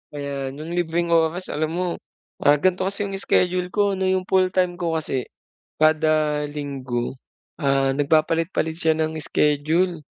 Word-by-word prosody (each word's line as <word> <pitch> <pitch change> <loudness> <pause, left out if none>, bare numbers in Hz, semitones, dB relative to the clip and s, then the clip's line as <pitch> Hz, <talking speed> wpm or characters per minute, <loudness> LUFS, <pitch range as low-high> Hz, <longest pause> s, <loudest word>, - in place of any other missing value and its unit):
Ayan 140 -1 -4
'yong 155 +3 -7
libreng 170 0 -1
oras, 165 +2 +1
alam 155 +1 -1
mo, 180 +1 0 0.5
ah, 145 +1 +5
ganito 185 +4 +1
kasi 200 +1 -2
'yong 195 -1 -4
schedule 180 -1 +1
ko 205 +2 +1
ano, 190 -1 -1
'yong 185 0 +1
full 185 0 +3
time 180 -1 +1
ko 165 -2 -1
kasi 135 -5 -2 0.5
kada 155 -1 +3
linggo, 135 -4 -4 0.5
ah, 135 -1 +2
nagpapalit-palit 160 +3 +1
siya 160 -1 +1
ng 160 0 -1
schedule. 155 +4 +1
160 Hz, 150 wpm, -23 LUFS, 145-180 Hz, 0.5 s, ah